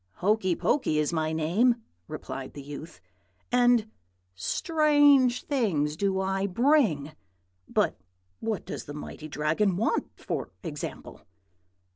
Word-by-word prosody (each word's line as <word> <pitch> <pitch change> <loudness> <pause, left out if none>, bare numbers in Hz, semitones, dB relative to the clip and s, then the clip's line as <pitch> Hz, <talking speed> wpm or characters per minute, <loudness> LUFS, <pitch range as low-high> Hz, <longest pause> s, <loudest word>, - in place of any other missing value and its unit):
"'Hokey 190 - +1
Pokey 165 - +1
is 150 +2 +1
my 160 -1 0
name,' 175 +11 +3 0.3
replied 135 -1 -6
the 145 - -7
youth, 145 +3 -9 0.5
'and 245 -2 +4 0.5
strange 290 - +3
things 175 - 0
do 190 +2 0
I 195 +1 0
bring. 205 - +2 0.6
But - - +1 0.4
what 220 -4 -3
does - - -6
the 145 - -8
mighty 150 +1 -7
Dragon 160 +6 +1
want, 225 - 0
for - - -3
example?' 150 -4 -6
190 Hz, 115 wpm, -27 LUFS, 155-245 Hz, 0.6 s, and